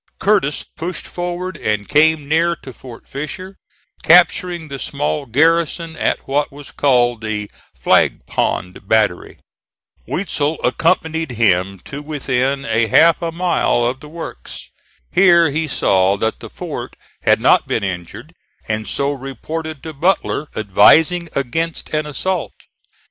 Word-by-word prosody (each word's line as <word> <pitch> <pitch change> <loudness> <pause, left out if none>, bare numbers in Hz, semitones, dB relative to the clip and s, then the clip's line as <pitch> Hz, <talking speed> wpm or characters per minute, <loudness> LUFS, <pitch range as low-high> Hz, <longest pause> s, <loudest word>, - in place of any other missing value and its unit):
Curtis 195 -8 +1
pushed 170 0 -6
forward 175 0 -5
and 105 -1 -2
came 150 0 +3
near 165 +3 +2
to 130 -5 -12
Fort 120 -2 -13
Fisher, 185 +7 -7 0.4
capturing 175 -3 +4
the 140 -2 -7
small 145 0 -2
garrison 165 +5 +1
at - - -1
what 145 +2 0
was 145 0 -11
called 120 -4 +2
the 105 -2 -4 0.2
Flag - - +2
Pond 90 +2 -2
Battery. 110 -5 +1 0.7
Weitzel 160 -4 -1
accompanied 160 +1 0
him 100 -4 +1
to 145 +1 -7
within 140 -2 -1
a 115 -3 +1
half 165 - +5
a 165 -1 -2
mile 170 -8 +1
of 125 +2 -1
the 150 - -12
works. 160 - -9 0.4
Here 170 -5 +5
he 155 +2 -1
saw 95 -7 +2
that 110 +2 -2
the - - -9
fort - - -7 0.3
had - - +3
not - - +3
been - - -1
injured, 95 - -6 0.3
and 110 -1 -2
so 140 +7 -1
reported 145 +3 -6
to 160 - -7
Butler, 155 -1 0
advising 155 - +4
against 160 +5 -2
an 155 0 0
assault. 180 +4 -2
145 Hz, 135 wpm, -18 LUFS, 120-165 Hz, 0.7 s, half